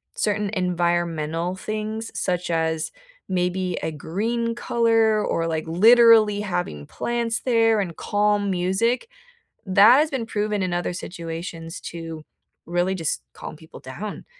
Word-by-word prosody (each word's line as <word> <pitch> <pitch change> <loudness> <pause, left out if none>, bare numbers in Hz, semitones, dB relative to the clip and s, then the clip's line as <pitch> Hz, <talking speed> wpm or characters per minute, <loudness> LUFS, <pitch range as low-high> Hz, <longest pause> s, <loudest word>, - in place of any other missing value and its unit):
certain 210 -1 0
environmental 175 -2 -1
things 215 +3 -4
such 180 -1 -1
as 160 -1 -1 0.4
maybe 180 0 -1
a - - -1
green 225 +10 -2
color 225 -2 +2
or, 165 0 -1
like, 160 -1 -2
literally 220 +3 +6
having 175 - -3
plants 235 -1 -2
there, 225 -3 +3
and 175 -5 -3
calm 205 0 +1
music, 190 - 0 0.6
that 205 +6 +7
has 305 +1 +2
been 265 -6 -3
proven 210 -3 -1
in 180 -1 -2
other 175 0 -1
situations 165 -2 -6
to 165 -2 -7 0.4
really 175 +2 0
just 165 -4 -2
calm - - -8
people 160 +1 -13
down, 185 +11 -7
190 Hz, 130 wpm, -23 LUFS, 170-220 Hz, 0.6 s, that